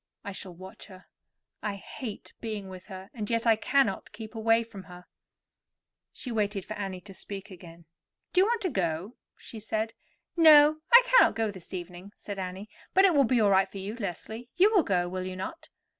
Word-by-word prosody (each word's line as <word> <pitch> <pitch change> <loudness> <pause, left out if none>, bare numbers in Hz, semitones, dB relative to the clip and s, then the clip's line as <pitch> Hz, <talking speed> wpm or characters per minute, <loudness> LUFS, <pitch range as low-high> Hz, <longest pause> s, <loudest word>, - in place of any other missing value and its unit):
I 200 - -5
shall 190 -2 -7
watch 190 +2 -11
her. 185 -2 -14 0.6
I 205 -1 -3
hate 210 +2 -8
being 215 -4 -5
with 185 -1 -11
her, 190 0 -10
and 215 -5 -5
yet 230 0 0
I 225 -1 +5
cannot 260 -2 +1
keep 220 0 -9
away 225 +1 +2
from 205 -4 -11
her." 180 -1 -13 1.1
She 250 - -7
waited 205 -3 -1
for - - -6
Annie 190 -3 -5
to 195 +2 -12
speak 195 +1 -8
again. 170 -2 -13 0.5
"Do 365 - +5
you - - +5
want 465 0 0
to 370 - 0
go?" 180 - -2 0.2
she 225 - -10
said. 220 +1 -2 0.4
"No; 310 -2 +7
I 485 +1 +10
cannot - - +5
go 225 -2 0
this 185 -4 -13
evening," 180 +2 -8
said 200 -1 -7
Annie; 190 +2 -5 0.3
"but 385 +1 +7
it 375 - +5
will 280 -3 +5
be 245 0 +2
all 205 -2 +4
right 190 0 +4
for - - -9
you, 195 +3 -5
Leslie. 220 +3 -6
You 405 +5 +5
will 390 - +6
go, 180 - 0
will 185 +1 -4
you 185 - -5
not?" 190 - -7
205 Hz, 205 wpm, -28 LUFS, 185-235 Hz, 1.1 s, I